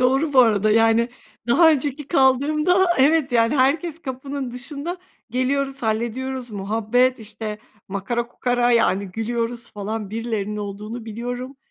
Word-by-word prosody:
doğru 270 +4 +2
bu 270 - +3
arada 215 -3 +3
yani 225 +1 +4 0.4
daha 320 +7 +6
önceki 290 0 -1
kaldığımda 305 +6 +3
evet, 285 0 +3
yani, 230 +4 +3
herkes 300 +5 +1
kapının 270 0 -5
dışında; 285 +8 -4 0.3
geliyoruz, 270 +2 -1
hallediyoruz, 240 +3 -2
muhabbet, 220 +5 +1
işte, 215 0 -6 0.3
makara 200 +5 -2
kukara 245 0 0
yani 200 -4 +3
gülüyoruz 235 +3 -3
falan, 210 0 -5
birilerinin 215 -2 -3
olduğunu 210 +3 -6
biliyorum, 245 +4 -5
245 Hz, 125 wpm, -22 LUFS, 220-270 Hz, 0.4 s, daha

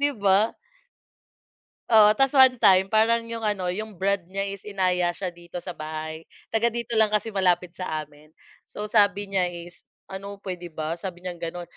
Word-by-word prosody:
Di 285 0 +3
ba? 200 +1 +2 1.3
Oo, 215 -2 +7
tapos 270 +1 +3
1 260 -2 +6
time 190 0 +5
parang 230 +1 +3
'yong 230 -1 -4
ano, 185 -4 -1
'yong 215 +1 -6
brad 200 +3 +1
niya 195 +1 -3
is 200 0 -5
inaya 180 -3 0
siya 185 -2 -4
dito 175 0 -16
sa 180 - -5
bahay, 155 0 -7 0.2
taga 225 +1 +2
dito 235 0 -4
lang 220 - +5
kasi 215 +1 -1
malapit 180 -3 +1
sa 160 -4 -4
amin. 150 +1 -19 0.4
So, 210 0 -7
sabi 205 -2 +3
niya 185 -2 +2
is, 175 0 -10 0.3
"Ano, 200 +1 -7
puwede 180 -3 -7
ba?" 160 +1 -4
Sabi 180 -1 -7
niyang 175 -2 -6
gano'n, 175 +1 -5
190 Hz, 180 wpm, -25 LUFS, 175-215 Hz, 1.3 s, Oo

